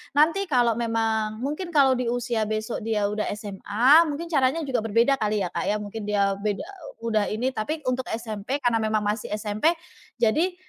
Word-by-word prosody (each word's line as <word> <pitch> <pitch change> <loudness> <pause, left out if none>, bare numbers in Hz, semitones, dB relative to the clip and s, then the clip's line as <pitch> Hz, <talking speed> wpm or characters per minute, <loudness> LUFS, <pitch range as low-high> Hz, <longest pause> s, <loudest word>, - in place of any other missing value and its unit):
Nanti 330 +7 +3
kalau 245 -5 +3
memang 225 -1 -1
mungkin 315 +5 -4
kalau 275 -2 +6
di 250 -1 -2
usia 235 -2 -1
besok 215 +2 -3
dia 215 -2 0
udah 210 0 -2
SMA 215 - +3
mungkin 320 +3 -5
caranya 280 +2 +2
juga 265 -4 -1
berbeda 230 +5 +3
kali 210 -2 0
ya 175 - -3
Kak - - -3
ya, 210 - +2
mungkin 210 +1 -6
dia 200 -1 +1
beda 205 0 -2 0.4
udah 215 -3 +1
ini, 245 +5 -1
tapi 300 +7 -4
untuk 255 0 -2
SMP, 230 +4 -4
karena 235 -2 +2
memang 215 -1 0
masih 210 +2 -2
SMP, 215 +10 0 0.5
jadi, 315 +11 +2
230 Hz, 180 wpm, -25 LUFS, 215-275 Hz, 0.5 s, kalau